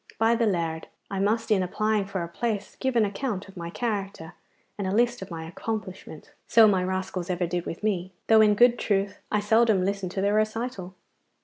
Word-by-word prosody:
By 225 +1 +3
the 230 -1 +2
Lard! 165 -4 -2 0.2
I 195 - -2
must, 220 +3 0
in 200 -3 +4
applying 210 +3 0
for 190 -2 -3
a - - -5
place, 210 +2 -3
give 265 -2 -1
an 225 -2 +4
account 205 -1 -3
of 195 - -15
my 170 -2 -6
character 195 -6 -4 0.4
and 200 -2 -3
a - - -1
list 240 0 +2
of 190 - -7
my 165 -2 -6
accomplishments. 190 -4 -6 0.2
So 225 -1 +7
my 190 -3 +2
rascals 185 -1 -3
ever 180 0 0
did 175 0 -3
with 165 - -6
me, 190 -4 -1
though 220 -1 +6
in 210 -1 +5
good 240 +2 +5
truth 200 -1 -1
I 210 - +2
seldom 220 -2 +3
listened 195 -2 -2
to 190 - -2
their 200 +1 +2
recital. 215 -3 -2
200 Hz, 205 wpm, -26 LUFS, 185-220 Hz, 0.4 s, So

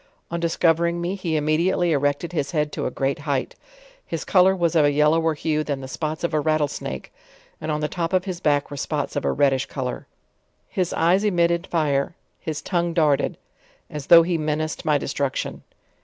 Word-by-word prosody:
On 170 - -2
discovering 170 0 +2
me, 175 +2 -2
he 185 -4 -3
imme 155 +1 +1
diately 175 -1 +2
erected 145 +3 0
his 145 -4 -1
head 150 -2 0
to - - -2
a - - -1
great 135 +2 -1
height; 140 -3 -2 0.5
his - - -5
color 190 0 +5
was 170 -2 +1
of 155 - +5
a 145 - +4
yellower 155 +2 +3
hue 155 0 -1
than 145 -3 -3
the 130 - -7
spots 155 +4 -4
of 170 - -1
a 155 - +2
rattle 155 0 +1
snake; 65 - -6 0.5
and 155 - -4
on 150 0 -1
the 150 - 0
top 170 +1 -3
of 185 0 +1
his 185 -3 -4
back 145 -5 +1
were 145 - -6
spots 145 0 -3
of 145 - -2
a - - +2
redish 135 -2 +2
color. 130 -3 -5 0.6
His 180 -2 -1
eyes 175 +5 +3
emitted 170 -3 +1
5re, 150 -2 +1 0.3
his 155 -2 -5
tongue 175 -2 -1
darted, 150 -5 +2 0.5
as 150 -2 -6
though 170 -1 +9
he 170 -1 -1
menaced 155 +1 -2
my 150 -2 +3
destruc 140 -1 -2
tion. - - -4
155 Hz, 200 wpm, -23 LUFS, 145-170 Hz, 0.6 s, though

